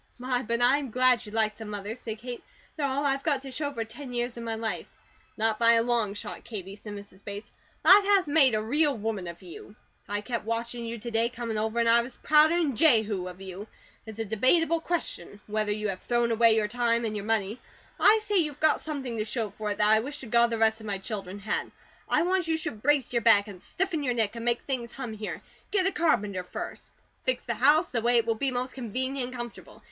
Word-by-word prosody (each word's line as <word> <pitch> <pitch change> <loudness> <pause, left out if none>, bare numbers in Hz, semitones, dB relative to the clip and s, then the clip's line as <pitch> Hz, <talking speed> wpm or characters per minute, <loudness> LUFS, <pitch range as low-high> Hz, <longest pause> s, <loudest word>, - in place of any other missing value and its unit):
"My, 250 0 -1
but 235 0 -1
I'm 270 +2 +3
glad 255 0 +3
you - - -9
like 215 -1 0
them, 220 -2 -8
Mother," 205 +1 -5
said 225 -3 -6
Kate. 245 +2 -7 0.3
"They 310 - -6
are 280 - +1
all 280 +2 -1
I've 275 -1 +1
got 280 -3 0
to 270 - -8
show 285 +2 -2
for 230 -4 -4
ten 250 +3 -9
years 240 0 -2
of 235 - -7
my 230 -1 -3
life." 220 0 -3 0.5
"Not 220 0 0
by 230 0 +6
a 230 0 +4
long 230 -4 0
shot, - - -7
Katie," 195 -4 -7
said 210 0 -9
Mrs. 200 -1 -11
Bates. 205 +1 -7 0.3
"Life 400 +2 +9
has 395 -4 +4
made 285 -5 +5
a 215 - -1
real 290 +4 +2
woman 210 -4 -3
of 170 +2 -9
you. 180 +3 -11 0.3
I 205 0 -2
kept 235 +1 -3
watchin' 230 +1 -3
you 230 +1 -4
to 235 +2 -7
day 230 +1 +2
comin' 230 -3 -4
over; 220 +2 -2
an' 230 - +2
I 230 +1 +6
was 245 +1 -9
prouder 310 +2 +4
'an 315 -7 +1
Jehu 220 - +3
of 180 +1 -9
you. 190 +2 -8 0.4
It's 220 -1 -8
a 225 - -2
debatable 310 - +3
question 315 - -3
whether 215 0 -1
you 210 0 -2
have 185 -1 -5
thrown 240 -1 +1
away 230 0 +5
your 215 -1 +1
time 235 0 0
and 215 -1 -3
your 205 -1 -4
money. 220 +1 -1 0.4
I 435 - +6
say 415 -1 +1
you've 300 -5 0
got 315 -1 +3
something 265 -7 -4
to - - +1
show 220 -1 -3
for 215 -1 -5
it 205 - -2
that 210 - +3
I 220 +1 +5
wish 280 +6 -5
to - - -7
God 235 +1 +4
the 230 - -2
rest 220 0 +3
of 220 - -9
my 200 -1 -2
children 195 -1 -5
had. 205 +1 -3 0.4
I - - +3
want 365 -1 +1
you 320 -1 +1
should 220 -9 -5
brace 285 -1 +2
your 235 - +2
back, 210 -2 +5
and 190 -4 -10
stiffen 360 -4 -2
your 250 -4 -1
neck, 225 -1 0
and 230 - -6
make 235 0 +1
things 245 -4 -3
hum 250 -5 -6
here. 215 0 -6 0.3
Get 390 -3 +1
a 385 - +2
carpenter 210 - +1
first. 180 - -7 0.3
Fix 255 -1 -1
the 235 - -1
house 295 - +4
the 235 - -1
way 240 +1 +3
it 230 - +3
will 230 - +1
be 270 +5 -1
most 255 0 -3
convenient 260 +2 -3
and 255 - -8
comfortable. 240 -1 -8
235 Hz, 245 wpm, -27 LUFS, 215-265 Hz, 0.5 s, Life